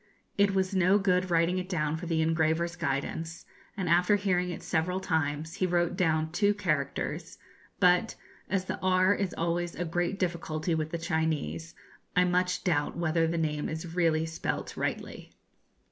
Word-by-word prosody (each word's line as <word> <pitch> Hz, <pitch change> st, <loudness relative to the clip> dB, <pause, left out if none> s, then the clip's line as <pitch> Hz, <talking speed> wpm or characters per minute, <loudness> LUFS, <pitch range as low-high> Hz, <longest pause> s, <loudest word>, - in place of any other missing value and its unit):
It 200 Hz, -1 st, +3 dB
was 190 Hz, 0 st, +1 dB
no 185 Hz, +1 st, +4 dB
good 185 Hz, -2 st, +1 dB
writing 170 Hz, +2 st, +2 dB
it 180 Hz, 0 st, -6 dB
down 150 Hz, -4 st, 0 dB
for 170 Hz, +2 st, -6 dB
the 160 Hz, -1 st, +1 dB
engraver's 165 Hz, +2 st, +1 dB
guidance, 160 Hz, +1 st, -3 dB, 0.3 s
and 190 Hz, -3 st, -2 dB
after 180 Hz, +5 st, +4 dB
hearing 180 Hz, -3 st, +1 dB
it 175 Hz, -, -6 dB
several 180 Hz, +4 st, 0 dB
times 160 Hz, -3 st, -1 dB
he 185 Hz, -, +1 dB
wrote 175 Hz, 0 st, +1 dB
down 160 Hz, -4 st, +1 dB
two 205 Hz, +3 st, +2 dB
characters; 155 Hz, -8 st, -2 dB, 0.4 s
but, 180 Hz, 0 st, +4 dB, 0.3 s
as 190 Hz, -1 st, 0 dB
the -, -, -4 dB
'r' 185 Hz, +1 st, +4 dB
is 195 Hz, -2 st, -2 dB
always 170 Hz, +1 st, -1 dB
a 175 Hz, -, -2 dB
great 175 Hz, +3 st, -1 dB
difficulty 170 Hz, -3 st, -2 dB
with 155 Hz, -1 st, -1 dB
the 170 Hz, -, -3 dB
Chinese, 160 Hz, -, -2 dB, 0.4 s
I 180 Hz, -, +5 dB
much 180 Hz, 0 st, +1 dB
doubt 150 Hz, -4 st, 0 dB
whether 165 Hz, -1 st, +1 dB
the 170 Hz, +1 st, -1 dB
name 150 Hz, -2 st, -1 dB
is 160 Hz, +1 st, -5 dB
really 165 Hz, -2 st, +2 dB
spelt 160 Hz, 0 st, -4 dB
rightly. -, -, -4 dB
170 Hz, 165 wpm, -29 LUFS, 160-180 Hz, 0.4 s, I